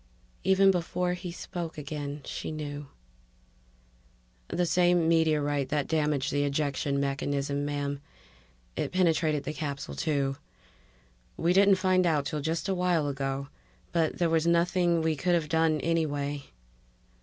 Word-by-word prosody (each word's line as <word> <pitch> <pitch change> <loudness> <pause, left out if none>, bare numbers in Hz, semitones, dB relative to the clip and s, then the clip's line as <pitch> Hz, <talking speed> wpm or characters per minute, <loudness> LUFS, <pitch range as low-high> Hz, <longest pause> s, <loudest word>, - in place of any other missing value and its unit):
Even 190 +1 +5
before 180 0 -1
he 180 0 -6
spoke 170 -2 -6
again, 145 -1 -5
she - - -5
knew 145 -2 -5 1.6
"The 180 - 0
same 175 -1 +3
meteorite 150 -4 +2
that 145 -2 0
damaged 150 -4 0
the 145 0 +1
ejection 140 -1 0
mechanism, 140 +1 -1
ma'am. 145 -1 -3 0.7
It - - -2
penetrated 160 -5 +2
the 150 - -4
capsule, 140 - -4
too. 135 - -1 1.0
We 170 +2 +2
didn't 195 +1 +6
find 185 -1 +2
out 150 -4 +1
till 150 0 -3
just 165 +5 -2
a 195 - +1
while 180 -4 +1
ago 135 0 -3 0.4
but 165 -2 +1
there 175 - +2
was 165 0 +2
nothing 170 0 +2
we 160 -1 +1
could 175 +4 +1
have 160 -3 -1
done 160 -1 +2
anyway 145 -4 -1
155 Hz, 135 wpm, -28 LUFS, 145-175 Hz, 1.6 s, didn't